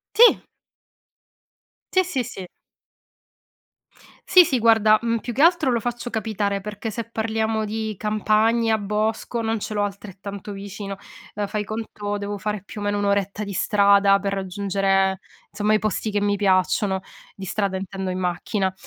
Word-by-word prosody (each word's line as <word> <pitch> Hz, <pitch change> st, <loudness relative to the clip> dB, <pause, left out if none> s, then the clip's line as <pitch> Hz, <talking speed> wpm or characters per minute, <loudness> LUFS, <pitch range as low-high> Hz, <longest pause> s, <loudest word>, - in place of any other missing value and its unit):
Sì. 475 Hz, +1 st, +7 dB, 1.5 s
Sì, 375 Hz, 0 st, +4 dB
sì, 275 Hz, -9 st, -1 dB
sì. 195 Hz, -6 st, -8 dB, 1.8 s
Sì, 365 Hz, -1 st, +8 dB
sì, 260 Hz, -4 st, 0 dB
guarda, 220 Hz, -2 st, +5 dB
mhmm, 230 Hz, 0 st, 0 dB
più 240 Hz, -, -5 dB
che 275 Hz, +6 st, +1 dB
altro 335 Hz, -5 st, +4 dB
lo 235 Hz, -2 st, +1 dB
faccio 240 Hz, +1 st, -4 dB
capitare, 210 Hz, -3 st, -1 dB
perché 210 Hz, +2 st, -5 dB
se 230 Hz, +2 st, -4 dB
parliamo 220 Hz, -1 st, -1 dB
di 220 Hz, 0 st, -3 dB
campagna, 220 Hz, +1 st, +2 dB
bosco, 215 Hz, +3 st, -2 dB
non 225 Hz, 0 st, -1 dB
ce 215 Hz, -, -5 dB
l'ho 205 Hz, -, +1 dB
altrettanto 200 Hz, 0 st, -6 dB
vicino, 200 Hz, 0 st, -6 dB, 0.4 s
ehm, 205 Hz, -1 st, -2 dB
fai 210 Hz, +1 st, -3 dB
conto, 210 Hz, -1 st, -4 dB
devo 205 Hz, 0 st, -4 dB
fare 210 Hz, -1 st, -3 dB
più 205 Hz, -, -8 dB
o -, -, -4 dB
meno 205 Hz, 0 st, 0 dB
1 205 Hz, -, 0 dB
oretta 200 Hz, +1 st, 0 dB
di 200 Hz, -, -6 dB
strada 200 Hz, 0 st, +4 dB
per 200 Hz, 0 st, -2 dB
raggiungere, 195 Hz, 0 st, 0 dB, 0.3 s
insomma, 210 Hz, +1 st, +1 dB
i -, -, +4 dB
posti 215 Hz, +1 st, -1 dB
che 205 Hz, -, +1 dB
mi 205 Hz, 0 st, +1 dB
piacciono, 190 Hz, 0 st, +2 dB, 0.3 s
di 195 Hz, -, -8 dB
strada, 195 Hz, 0 st, -1 dB
intendo, 190 Hz, 0 st, -4 dB
in 185 Hz, -, -3 dB
macchina, 185 Hz, +2 st, -1 dB
210 Hz, 160 wpm, -23 LUFS, 200-220 Hz, 1.8 s, Sì